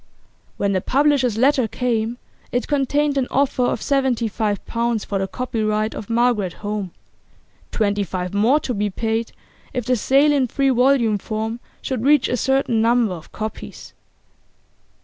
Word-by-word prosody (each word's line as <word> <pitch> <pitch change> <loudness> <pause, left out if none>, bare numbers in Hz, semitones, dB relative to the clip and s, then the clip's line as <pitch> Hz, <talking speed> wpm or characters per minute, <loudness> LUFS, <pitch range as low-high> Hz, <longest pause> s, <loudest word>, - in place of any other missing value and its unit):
When 200 - 0
the 185 -2 0
publishers' 270 -3 +2
letter 260 0 +3
came 235 0 -1 0.3
it 245 - -1
contained 285 0 +1
an 255 - -1
offer 270 -1 +1
of 245 - 0
seventy 265 -4 +1
five 210 -1 -2
pounds 235 -2 -1
for 195 - -2
the 195 - -1
copyright 215 -2 -1
of 210 - -8
'Margaret 230 -6 +1
Home,' 205 -2 -2 0.8
twenty 205 -2 0
five 180 -1 -4
more 230 +9 +3
to 250 - -3
be 205 -1 -1
paid 225 +3 -2 0.4
if 250 -4 -2
the 250 +1 +2
sale 275 +6 +3
in 270 -3 +2
three 275 +3 +1
volume 245 -4 +3
form 220 +2 -4 0.2
should 255 -4 -3
reach 285 -1 +4
a - - +1
certain 265 -2 +1
number 230 -3 +2
of 165 -3 -10
copies. 215 0 -7
235 Hz, 155 wpm, -21 LUFS, 215-265 Hz, 0.8 s, reach